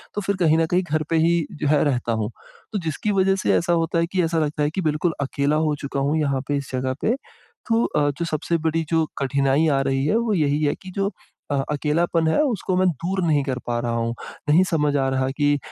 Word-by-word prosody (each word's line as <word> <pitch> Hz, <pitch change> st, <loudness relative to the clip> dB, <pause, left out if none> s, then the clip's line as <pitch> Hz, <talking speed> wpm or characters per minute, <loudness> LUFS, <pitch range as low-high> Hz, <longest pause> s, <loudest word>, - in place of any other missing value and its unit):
तो 205 Hz, -, -1 dB
फिर 200 Hz, 0 st, -1 dB
कहीं 160 Hz, -3 st, +4 dB
न 165 Hz, -, +3 dB
कहीं 180 Hz, +1 st, +3 dB
घर 155 Hz, 0 st, +1 dB
पे 165 Hz, -, +1 dB
ही 170 Hz, -2 st, +2 dB, 0.2 s
जो -, -, +1 dB
है 150 Hz, 0 st, +3 dB
रहता 125 Hz, -5 st, 0 dB
हूँ। 105 Hz, -, -3 dB, 0.4 s
तो 205 Hz, -, 0 dB
जिसकी 165 Hz, +5 st, -2 dB
वज़ह 195 Hz, -1 st, +3 dB
से -, -, +3 dB
ऐसा 175 Hz, 0 st, +1 dB
होता 165 Hz, 0 st, +1 dB
है 165 Hz, -, +2 dB
कि 185 Hz, -2 st, +1 dB
ऐसा 165 Hz, 0 st, +1 dB
लगता 150 Hz, -1 st, -1 dB
है 145 Hz, -, +2 dB
कि 190 Hz, -, -2 dB
बिल्कुल 155 Hz, +1 st, 0 dB
अकेला 140 Hz, +1 st, 0 dB
हो 150 Hz, -, 0 dB
चुका 140 Hz, -1 st, -3 dB
हूँ 145 Hz, +3 st, +1 dB
यहाँ 140 Hz, -3 st, 0 dB
पे 145 Hz, -, 0 dB
इस 140 Hz, -2 st, -6 dB
जगह 130 Hz, 0 st, -1 dB
पे। 230 Hz, -, +2 dB, 0.5 s
तो 230 Hz, +1 st, +3 dB
अ, 145 Hz, -1 st, +1 dB
जो 170 Hz, -, 0 dB
सबसे 165 Hz, +1 st, -1 dB
बड़ी 165 Hz, +1 st, +1 dB
जो 160 Hz, -1 st, +2 dB
कठिनाई 140 Hz, +3 st, +2 dB
आ 135 Hz, -2 st, +2 dB
रही 135 Hz, 0 st, 0 dB
है 175 Hz, -, +2 dB
वो 230 Hz, -2 st, 0 dB
यही 150 Hz, -4 st, +1 dB
है 145 Hz, -, +1 dB
कि 185 Hz, -, -9 dB
जो 200 Hz, 0 st, 0 dB, 0.4 s
अ, -, -, +2 dB, 0.2 s
अकेलापन 160 Hz, +3 st, +1 dB
है 160 Hz, -, +3 dB
उसको 220 Hz, -9 st, -1 dB
मैं 185 Hz, 0 st, +3 dB
दूर 180 Hz, +5 st, -2 dB
नहीं 150 Hz, -3 st, +3 dB
कर 130 Hz, -2 st, -3 dB
पा 120 Hz, -1 st, 0 dB
रहा 120 Hz, 0 st, -2 dB
हूँ, 115 Hz, 0 st, -1 dB, 0.4 s
नहीं 165 Hz, +5 st, +6 dB
समझ 150 Hz, -3 st, +1 dB
आ 135 Hz, -1 st, +1 dB
रहा 130 Hz, 0 st, 0 dB
कि 145 Hz, -1 st, +3 dB
155 Hz, 250 wpm, -23 LUFS, 140-175 Hz, 0.5 s, नहीं